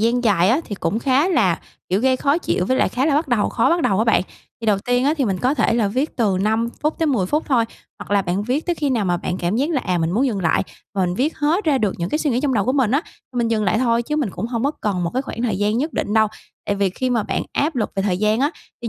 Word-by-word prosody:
gian 240 +2 +1
dài 190 -4 +3
á, 265 +8 +3
thì 205 - -5
cũng 215 +3 -1
khá 275 +6 +2
là, 220 - +2 0.3
kiểu, 190 +3 +1
gây 260 +1 +3
khó 280 +4 +1
chịu 180 - -1
với 260 - +1
lại - - +2
khá 260 +3 0
là 305 - +2
bắt 300 +1 +1
đầu 235 -5 +2
khó 230 - +1
bắt 340 0 +2
đầu 195 0 +2
á 220 - +3
bạn. 225 -5 +3 0.4
Thì 225 - -5
đầu 205 -2 +3
tiên 245 +4 0
á, 290 +3 +3
thì 275 - +1
mình 195 -4 -1
có 255 +7 +1
thể 230 - +2
là 225 -4 +2
viết 260 +9 -2
từ 205 -6 +1
5 220 +3 +1
phút 305 +1 0
tới 325 - +1
10 240 -11 +1
phút 300 +10 0
thôi. 245 -5 +3 0.3
Hoặc - - -10
là 200 -1 +3
bạn 185 +2 -1
viết 255 +8 -1
tới 350 - +1
khi 290 -3 -1
nào 230 -5 +1
mà 175 -2 +1
bạn 175 +1 -3
cảm 175 +4 -1
giác 280 +6 0
là, 290 -6 +1
à, 180 -2 0
mình 165 0 0
muốn 240 +9 +2
dừng 215 -7 -1
lại 170 -3 +2 0.3
và 195 - 0
mình 175 - -2
viết 275 - -1
hết 320 +7 +1
ra 295 -4 +2
được 210 -5 0
những 170 - -2
cái 300 - -1
suy 300 - 0
nghĩ 245 0 +1
trong 275 -2 0
đầu 205 -4 +1
của 255 - +1
mình 265 -6 +2
á, 280 +6 +2
thì 265 -10 -17
mình 235 -1 +1
dừng 220 -2 0
lại 200 +3 +2
thôi. 235 -1 +2
Chứ 300 +5 -3
mình 280 -9 0
cũng 225 - -4
hông 235 0 -2
có 285 - +3
cần 195 -4 -1
một 170 - -1
cái 260 - 0
khoảng 235 -3 -6
thời 215 -6 0
gian 210 +2 +1
nhất 300 +4 -2
định 205 - -2
đâu. 220 0 +5 0.4
Tại 205 - 0
vì 200 -1 +1
khi 255 +7 -2
mà 230 -3 +1
bạn - - -2
áp 295 0 0
lực 220 - -1
về 195 - 0
thời 185 -3 0
gian 215 +3 +1
á, 285 +2 +2 0.3
thì 235 - -2
235 Hz, 325 wpm, -21 LUFS, 200-275 Hz, 0.4 s, đâu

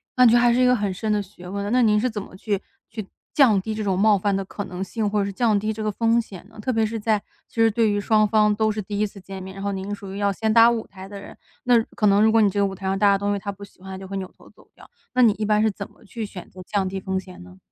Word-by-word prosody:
那 250 - +5
就 235 +1 +6
还 240 0 +4
是 250 - +2
一 255 - +5
个 250 - +5
很 205 -4 -1
深 215 +4 -2
的 210 -1 +1
学 180 -2 -13
问， 200 +1 -3
那 255 - +4
您 210 -2 +4
是 255 - +1
怎 215 -3 -4
么 190 - -12
去 200 0 -2 0.3
去 215 -3 -7 0.3
降 240 -9 +5
低 220 +3 -4
这 215 - -4
种 190 -2 0
冒 210 +1 +5
犯 200 +1 0
的 195 - -1
可 205 +1 -6
能 180 +1 -5
性， 210 +2 -2
或 210 0 0
者 - - 0
是 200 - -5
降 220 0 +2
低 215 +2 -1
这 215 - -7
个 215 - -1
风 230 +2 +2
险 195 -3 -12
呢？ 220 - -15
特 255 - -1
别 225 -2 +2
是 225 +1 -3
在 215 0 +2 0.3
其 - - -27
实 225 -1 +4
对 225 0 +2
于 205 0 0
双 215 +1 +3
方 210 0 +3
都 215 +1 +1
是 215 0 -3
第 205 +1 -5
1 210 - +2
次 200 - -13
见 190 0 -8
面， 190 +1 -9
然 195 - -7
后 200 - -1
您 190 0 -5
是 205 - -2
属 195 -1 -9
于 - - -6
要 200 0 +1
先 215 +2 -1
搭 230 +1 +7
舞 235 -2 -2
台 190 -1 -11
的 200 0 -9
人， 200 - -11 0.3
那 245 -2 +4
可 210 - +2
能 200 +1 +4
如 220 - +5
果 225 0 +4
你 205 - +4
这 200 - -2
个 200 - +3
舞 195 -1 -3
台 190 0 -9
上 190 0 0
搭 200 -1 +5
的 - - +2
东 200 +1 -1
西 200 - -2
他 200 - -6
不 200 +1 -12
喜 200 - -15
欢， 190 - -10
他 190 - -6
就 190 - -9
会 195 +1 -5
扭 190 -1 -4
头 - - -18
走 - - -22
掉， - - -17 0.2
那 255 - +3
你 235 -3 +6
一 215 +1 -3
般 210 0 +2
是 220 0 +2
怎 200 0 -8
么 - - -23
去 225 +2 -6
选 190 -3 -10
择 185 - -12
降 200 -2 0
低 190 0 -4
风 190 0 -3
险 185 -1 -12
呢？ 90 +1 -14
205 Hz, 365 characters per minute, -23 LUFS, 195-220 Hz, 0.3 s, 搭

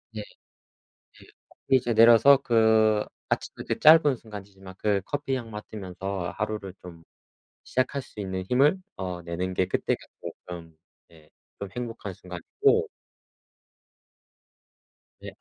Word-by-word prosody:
예. - - -4
예. - - -4 1.4
그리고 130 -1 +4
이제 120 -1 -1
내려서 115 +5 +7
그 110 -4 +3 0.2
아침의 - - -3
그 - - -1
짧은 155 -3 +7
순간이지만 100 -4 -11
그 105 -2 +1
커피 145 +1 -2
향 115 -3 -7
맡으면서 95 -3 -5
하루를 105 -3 -4
좀 85 -2 -11 0.6
시작할 130 +2 -1
수 105 - -11
있는 95 -2 -3
힘을 140 +8 +4 0.2
어 90 -2 -5
내는 90 +2 -4
게 95 - +1
그때가 - - -1 0.2
쪼끔 85 -2 -9 0.3
예 80 -2 -20 0.3
좀 100 - -5
행복한 115 -4 -5
순간이고 90 -1 0 2.3
네. - - -8
105 Hz, 240 characters per minute, -26 LUFS, 95-120 Hz, 2.3 s, 내려서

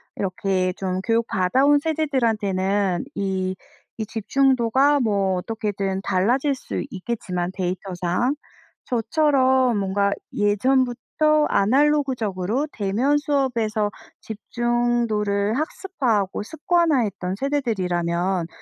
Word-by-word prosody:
이렇게 185 -1 -1
좀 185 -1 -3
교육 230 +2 +1
받아 190 +9 +2
온 290 0 +5
세대들한테는 215 - 0
이, 190 -1 -1 0.4
이 220 - -3
집중도가 265 +4 +2
뭐 200 -5 +1
어떻게든 200 -2 -3
달라질 250 +11 +1
수 - - -5
있겠지만 185 -5 -3
데이터상. 185 - -1 0.5
저처럼 260 -1 +2
뭔가 200 0 +1 0.2
예전부터 260 +8 +2
아날로그적으로 255 -2 +1
대면 225 +8 +1
수업에서 235 -7 0 0.3
집중도를 225 -2 0
학습화하고 255 - -1
습관화했던 255 - 0
세대들이라면 185 - -1
220 Hz, 260 characters per minute, -23 LUFS, 195-265 Hz, 0.5 s, 온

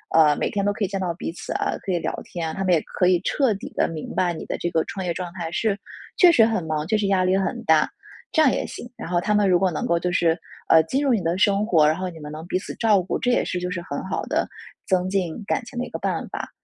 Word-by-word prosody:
呃， 155 -2 +6
每 - - -1
天 200 -1 -1
都 205 - +2
可 205 - -3
以 - - +2
见 195 +1 -3
到 180 -2 -1
彼 165 - -5
此 170 - -6
啊， - - -1
可 195 - -1
以 175 - +1
聊 - - -3
天 170 -2 -4
啊， - - -5
他 195 - -3
们 185 - +3
也 160 - +3
可 180 - 0
以 180 -1 +3
彻 265 -1 +2
底 195 - -8
地 - - +3
明 160 -2 -6
白 175 -1 +1
你 160 - -7
的 - - -3
这 175 - -2
个 160 -1 +2
创 190 -2 -5
业 175 - 0
状 175 0 -5
态 170 -3 -4
是 205 +2 0 0.4
确 360 -2 +8
实 245 -9 +6
很 220 -5 0
忙， 155 -1 -2
确 215 +3 +2
实 210 -1 0
压 190 -2 +3
力 185 +1 +3
很 230 +5 -2
大。 160 -5 +4 0.4
这 315 - +3
样 280 -5 +5
也 - - -1
行。 240 - -8
然 - - -6
后 175 -1 +1
他 210 +3 0
们 205 -2 +3
如 180 - +5
果 185 0 +1
能 155 - -3
够 170 - +2
就 180 +1 -1
是， 170 -2 +2 0.3
呃， 160 0 +6
进 260 - -1
入 275 -3 +3
你 220 - +1
的 170 +1 0
生 200 +2 +3
活， 160 -8 +4
然 155 - +3
后 185 +1 -3
你 165 -2 -11
们 150 -1 -8
能 155 +2 -7
彼 185 - 0
此 - - -8
照 215 -4 +3
顾， 180 - -2
这 250 - 0
也 - - +2
是 180 - -2
就 180 0 -3
是 180 -2 -3
很 - - -5
好 - - -3
的 - - 0 0.4
增 185 -1 +1
进 185 -2 -1
感 - - -1
情 240 +1 -7
的 245 - -1
一 - - -10
个 - - -5
办 - - -2
法。 - - -5
185 Hz, 330 characters per minute, -23 LUFS, 170-205 Hz, 0.4 s, 确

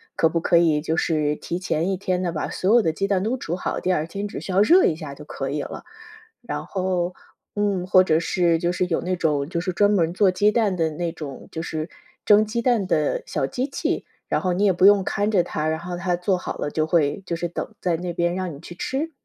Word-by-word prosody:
可 160 - +3
不 165 - 0
可 170 +1 +3
以 160 -3 +3
就 160 +1 -1
是 150 -3 +1
提 170 - -4
前 170 -1 -1
1 190 - -1
天 185 -1 -1
呢， 175 -2 -1
把 155 - -3
所 190 +4 +1
有 240 - +6
的 165 - +1
鸡 195 +4 -1
蛋 195 -2 +1
都 225 +5 0
煮 170 -7 -3
好， 180 - -3
第 185 - 0
2 155 -2 0
天 200 +5 -5
只 - - -6
需 - - -6
要 185 +2 +4
热 350 - +6
一 160 - +2
下 155 -3 -7
就 150 - -12
可 135 -2 -4
以 145 +1 -2
了。 - - -7 0.6
然 - - -4
后， 185 -2 -1 0.4
嗯， 200 -3 0
或 185 0 +6
者 160 -3 +2
是 170 0 +2
就 170 +1 0
是 180 0 -1
有 165 - 0
那 185 +1 -1
种 150 -5 0
就 170 +1 -2
是 185 +1 -2
专 205 +3 +3
门 170 -5 +2
做 190 0 +3
鸡 205 +3 +3
蛋 215 -4 +1
的 165 -2 +1
那 170 +2 -3
种 145 -4 -8
就 160 - -4
是 160 -1 -4 0.4
蒸 210 0 +6
鸡 235 +2 -3
蛋 230 -7 +2
的 155 -5 +1
小 - - -1
机 250 - -2
器， 275 - -2 0.2
然 - - 0
后 185 - 0
你 190 +3 0
也 195 - +4
不 180 +2 +5
用 205 -1 +6
看 205 +2 0
着 190 -5 +3
它， 155 0 -3
然 160 0 0
后 175 +1 -5
它 175 0 0
做 180 +2 0
好 - - -5
了 145 - -3
就 155 0 0
会 160 +1 +1
就 170 - -1
是 175 +1 -2
等 170 - -6
在 175 -2 0
那 175 +1 -4
边 175 0 0
让 185 -1 -3
你 140 - -12
去 170 - -10
吃？ 275 - -3
180 Hz, 275 characters per minute, -23 LUFS, 160-195 Hz, 0.6 s, 有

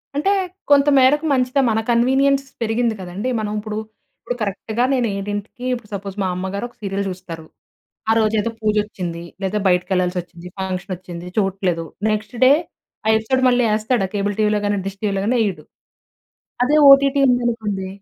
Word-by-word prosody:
అంటే 300 +8 +1 0.4
కొంతమేరకు 280 +1 +5
మంచిదే. 255 +1 +2
మన 220 - +1
కన్వీనియన్స్ 270 +3 +3 0.2
పెరిగింది 230 0 0
కదండీ! 185 +7 -4
మనం 210 -1 -3
ఇప్పుడు, 210 0 -5 0.4
ఇప్పుడు 245 - -4
కరెక్ట్‌గా 215 +4 -1
నేను 245 -3 +1
ఏడింటికి 205 +4 -5
ఇప్పుడు 235 -4 -6
సపోజ్ 195 -1 -5
మా - - 0
అమ్మగారు 190 +4 -3
ఒక - - -27
సీరియల్ 200 0 -2
జూస్తారు. 180 -3 -7 0.7
ఆరోజు 220 -1 +2
ఏదో 230 - -2
పూజొచ్చింది. 205 -5 -2 0.2
లేదా 195 +2 -1
బయటికెళ్ళాల్సి 180 0 +1
వచ్చింది. 175 0 -13
ఫంక్షన్ 185 0 -3
ఒచ్చింది 175 -1 -9
చూడట్లేదు, 190 -4 0 0.3
నెక్స్ట్ 215 +2 -3
డే 260 - +7 0.6
ఆ - - +4
ఎపిసోడ్ 260 +4 0
మళ్ళీ 245 0 +3
యేస్తాడా? 215 -1 +1
కేబుల్ 205 0 -1
టీవీలో 210 -1 +2
గాని, 205 0 +1
డిష్ 195 0 -7
టీవీలో 200 -2 0
గాని 245 +4 +2
యేయడు. 200 -4 -2 1.0
అదే 295 - +2 0.2
ఓటీటీ 275 0 +5
ఉందనుకోండి. 225 -6 -1
210 Hz, 150 wpm, -20 LUFS, 190-245 Hz, 1.0 s, డే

